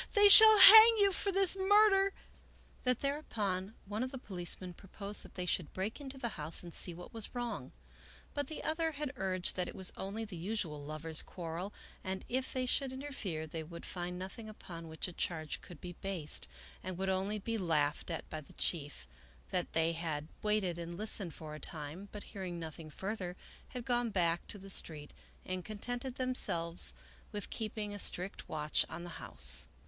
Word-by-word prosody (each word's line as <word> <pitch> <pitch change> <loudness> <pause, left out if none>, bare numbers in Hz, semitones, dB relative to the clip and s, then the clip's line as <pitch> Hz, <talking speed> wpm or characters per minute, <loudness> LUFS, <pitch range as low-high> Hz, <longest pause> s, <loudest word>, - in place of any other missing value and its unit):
They 410 0 +8
shall 435 +1 +12
hang 440 +3 +11
you 400 -1 +4
for 395 +2 0
this 390 -1 +4
murder! 395 0 +5 0.4
" - - -28
that 250 -1 +1
thereupon 215 -9 -2
one 205 +3 -4
of 255 - -1
the 265 - -7
policemen 180 -4 -6
proposed 200 +3 -5
that - - -13
they 180 - -3
should 175 -3 -1
break 200 +9 -4
into 270 -1 -8
the 245 -3 -3
house 155 +4 -1
and 170 -1 -10
see 180 - +1
what 175 +1 -11
was 225 +1 -5
wrong, 240 -1 -4 0.6
but 285 -2 -2
the 310 - -7
other 320 0 -1
had 290 -1 -4
urged 185 -4 -1
that 180 -1 -1
it - - -8
was 190 -1 +1
only 205 +4 -5
the 205 -4 -9
usual 170 -5 -4
lovers' 155 +1 -1
quar 165 -3 -7
rel 195 +4 -5 0.3
and 190 0 -4
if 260 +1 -2
they 255 -1 -1
should 265 +1 0
interfere 260 - -5
they 160 +1 -6
would 170 +2 -9
find 180 0 -5
nothing 195 +4 -8
upon 170 -5 -10
which 160 +2 -3
a 180 - -8
charge 160 -3 -3
could 175 -4 -12
be 175 -1 -8
based 180 -5 -1 0.3
and 185 -1 -6
would 190 +1 -1
only 190 +3 -1
be 225 +2 -3
laughed 155 -5 0
at 165 - -5
by 155 - -6
the 140 - -17
chief; 145 - -1 0.4
that - - -2
they 165 0 +2
had 160 -3 -4
waited 205 -5 0
and 170 0 -6
listened 200 -5 -2
for 155 -1 -8
a 155 - -8
time, 160 +6 -5
but 210 - -8
hearing 185 -4 -5
nothing 160 -1 -8
further 190 +1 -5 0.3
had 250 -2 -7
gone 240 -2 +1
back 175 -4 0
to - - -5
the 195 0 -9
street 150 -5 -2 0.3
and 185 -1 -4
contented 245 +5 -4
themselves 175 -10 +3 0.4
with 205 -2 -5
keeping 215 -2 -4
a 205 - -6
strict 185 +1 0
watch 150 -1 0
on 170 - -7
the - - -7
house. 65 -2 0
190 Hz, 195 wpm, -33 LUFS, 170-245 Hz, 0.6 s, shall